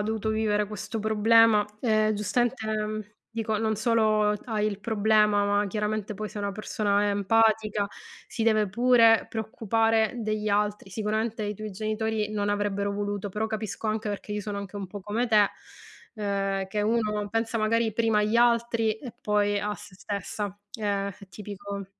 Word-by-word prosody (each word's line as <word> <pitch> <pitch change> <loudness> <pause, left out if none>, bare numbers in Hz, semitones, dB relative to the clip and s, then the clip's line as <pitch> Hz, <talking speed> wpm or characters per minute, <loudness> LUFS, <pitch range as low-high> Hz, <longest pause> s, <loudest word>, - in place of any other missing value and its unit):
dovuto 220 +1 -2
vivere 215 -1 +1
questo 215 +1 -5
problema, 220 0 +5
ehm, 215 -2 +2
giustamente, 220 +3 0
mhmm, 215 0 -2 0.3
dico 220 -2 -2
non 220 -1 0
solo 215 -1 +2
t - - -17
hai 215 -2 0
il 200 -1 -5
problema, 210 -1 +3
ma 205 0 +2
chiaramente 210 0 -2
poi 215 +1 -5
sei 205 - -6
una 200 -1 -2
persona 205 0 0
empatica, 210 0 +2 0.4
si 225 - -2
deve 215 -3 +3
pure 230 +1 +5
preoccupare 225 0 +1
degli 215 -1 -2
altri. 205 -1 0
Sicuramente 215 +2 -2
i 205 -1 -3
tuoi 215 -1 -6
genitori 215 +1 -2
non 205 -1 -1
avrebbero 200 -1 -1
voluto, 205 0 -3
però 215 +3 -2
capisco 215 0 -4
anche 215 0 -1
perché 205 +1 -5
io 210 0 -2
sono 205 0 -4
anche 200 0 -7
un 195 -2 -4
po' 205 +2 -8
come 215 +5 -1
te, 210 -3 +5 0.7
ehm, 195 -2 -1
che 210 +2 -2
uno 210 -1 0
pensa 225 +1 -1
magari 220 +1 +1
prima 225 -1 +2
agli 215 +2 +1
altri 235 -2 +3
e 250 -4 -8
poi 205 -1 +1
a 210 +1 -2
se 205 -2 -13
stessa, 205 0 -4 0.2
eh, 200 -2 -1
è 200 0 -11
tipico. 200 +1 -7
210 Hz, 165 wpm, -27 LUFS, 205-220 Hz, 0.7 s, problema